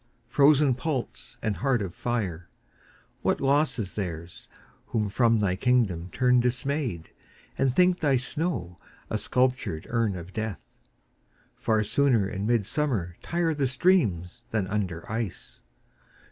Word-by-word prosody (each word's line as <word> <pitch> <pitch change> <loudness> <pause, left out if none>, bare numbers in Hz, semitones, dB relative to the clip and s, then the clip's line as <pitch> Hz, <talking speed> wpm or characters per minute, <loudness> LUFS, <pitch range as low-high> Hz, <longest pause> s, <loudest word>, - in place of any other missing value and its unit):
frozen 145 -1 +5
pulse 125 -2 -4
and 110 -3 -1
heart 130 -2 +1
of 95 -4 -4
fire, 95 -9 -3 0.7
What - - +1
loss 140 +1 +2
is 100 -6 -3
theirs 85 -4 -6 0.4
who 105 -3 -1
from 115 +2 +3
thy 100 -4 +1
kingdom 100 -7 +1
turn 125 -1 +3
Dismayed, 125 - -1 0.4
and 130 -2 +1
think 180 +1 +4
thy 140 -4 +3
snow 130 - -2 0.3
a 110 - 0
sculptured 125 -9 0
urn 115 -4 +1
Of 90 +1 -8
death! 110 -2 -5 0.8
Far 110 -1 +1
sooner 120 -3 +2
in 100 +1 -3
midsummer 115 - 0
tire 170 -1 0
The 140 -3 0
streams 120 - +1
than 110 -4 0
under 95 -4 -3
ice. 110 - -5
115 Hz, 130 wpm, -27 LUFS, 95-135 Hz, 0.8 s, frozen